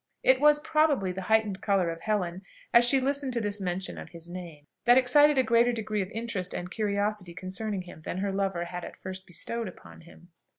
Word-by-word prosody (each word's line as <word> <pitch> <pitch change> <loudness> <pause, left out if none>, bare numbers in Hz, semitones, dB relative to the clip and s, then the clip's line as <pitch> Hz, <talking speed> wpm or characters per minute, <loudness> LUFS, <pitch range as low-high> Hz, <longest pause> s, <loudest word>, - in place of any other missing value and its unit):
It 260 +1 +4
was, 295 0 +6
probably, 295 -11 +1
the 190 +1 -5
heightened 215 -3 +2
colour 195 -5 +1
of 165 0 -8
Helen 190 -4 -2 0.3
as 235 0 +7
she 270 +2 +5
listened 275 0 -1
to 240 - 0
this 205 -2 -2
mention 185 +1 -3
of - - -9
his 170 0 -9
name 170 -5 -9 0.2
that 245 +1 +7
excited 290 +3 +5
a 260 - +5
greater 235 0 +3
degree 215 -3 -2
of 190 - -4
interest 220 -5 -3
and 180 +1 -5
curiosity 205 -3 -1
concerning 185 +2 -3
him 175 -3 -12
than 170 - -5
her 195 +1 -1
lover 195 -3 -1
had 175 0 -6
at - - -9
first 190 0 -8
bestowed 230 +6 -3
upon 180 - -12
him. 170 +1 -17
200 Hz, 210 wpm, -28 LUFS, 180-235 Hz, 0.3 s, as